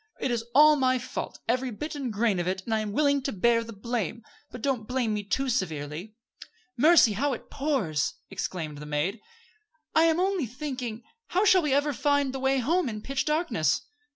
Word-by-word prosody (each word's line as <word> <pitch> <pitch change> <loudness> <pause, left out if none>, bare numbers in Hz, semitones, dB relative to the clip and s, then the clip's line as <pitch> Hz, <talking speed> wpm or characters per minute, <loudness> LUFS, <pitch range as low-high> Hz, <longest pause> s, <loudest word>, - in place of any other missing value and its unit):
It 260 - -1
is 230 -1 -1
all 300 +1 +7
my 255 -1 +2
fault, 255 +1 -5
every 255 +2 0
bit 295 +7 -5
and 275 -5 -3
grain 210 -2 +1
of 175 - -2
it, 190 +1 -2
and 225 - -2
I 220 - +2
am 215 -1 -3
willing 285 +3 +2
to 275 - -2
bear 230 +4 +2
the 230 - -9
blame; 230 0 -3 0.3
but 245 - -10
don't 255 -6 -1
blame 250 -4 0
me 210 -1 -2
too 265 +7 -1
severely." 170 - -3 0.6
"Mercy! 290 -4 +6
how 275 +7 0
it 240 - -9
pours!" 210 - -1 0.2
exclaimed 165 -6 -4
the 150 - -8
maid. 150 +9 -1 0.7
"I 320 +1 +5
am 325 0 +3
only 370 -7 0
thinking 250 -3 -5 0.2
how 380 +4 +1
shall 375 -2 +6
we 300 -4 -1
ever 290 +1 +2
find 285 0 +1
the 270 - -4
way 265 +1 +2
home 305 +4 +1
in 215 -1 -6
pitch 270 -1 -2
darkness?" 240 - +1
245 Hz, 200 wpm, -27 LUFS, 210-285 Hz, 0.7 s, all